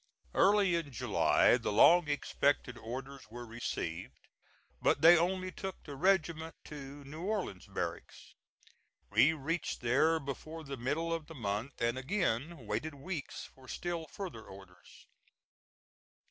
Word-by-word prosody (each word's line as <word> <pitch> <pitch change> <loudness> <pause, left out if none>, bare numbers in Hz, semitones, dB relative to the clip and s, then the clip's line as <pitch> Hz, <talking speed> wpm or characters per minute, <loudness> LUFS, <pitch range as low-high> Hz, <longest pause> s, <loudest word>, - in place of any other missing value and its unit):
Early 200 -2 +4
in 165 -4 -1
July 120 - +3
the - - -2
long 170 +10 +6
expected 145 -3 0
orders 130 +2 -7
were 120 +2 -8
received, 95 -7 -4 0.6
but - - +3
they 170 +2 +10
only 185 +2 0
took 190 +1 -6
the 145 - -8
regiment 165 -1 +1
to 145 -1 -9
New 150 +4 -9
Orleans 190 - -3
Barracks. - - -5 0.8
We 155 +4 +5
reached 160 +3 -3
there 145 +7 +3
before 155 +3 -6
the 140 -2 -5
middle 150 +7 -1
of 165 -2 -4
the 160 - -10
month, 115 +2 -3
and 120 +1 0
again 140 - -1
waited 145 +9 -3
weeks 155 +1 -5
for 130 -1 -17
still 170 0 -4
further 145 - -7
orders. 95 -3 -14
145 Hz, 130 wpm, -33 LUFS, 125-170 Hz, 0.8 s, they